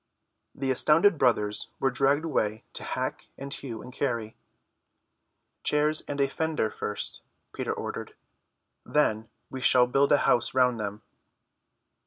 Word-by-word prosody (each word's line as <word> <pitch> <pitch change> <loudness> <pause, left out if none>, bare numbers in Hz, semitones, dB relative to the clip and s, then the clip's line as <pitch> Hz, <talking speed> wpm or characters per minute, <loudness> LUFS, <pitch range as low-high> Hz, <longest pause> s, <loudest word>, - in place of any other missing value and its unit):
The 135 -1 -1
astounded 160 +6 +4
brothers 105 -5 +2
were 135 - +1
dragged 140 +5 +1
away 110 -8 -1
to - - 0
hack - - -4
and 140 +1 -5
hew 120 -8 -5
and 125 - -11
carry. 115 -6 -3 1.3
"Chairs 150 +1 +3
and 145 0 -4
a 140 - +3
fender 155 -6 -2
first," - - -3 0.3
Peter - - -3
ordered. - - -6 0.7
"Then 110 -7 0 0.2
we 130 - -6
shall 125 -1 +6
build 135 +3 +2
a 145 - +6
house 120 +2 +2
round 125 -2 +3
them." 105 0 -5
130 Hz, 135 wpm, -27 LUFS, 115-145 Hz, 1.3 s, shall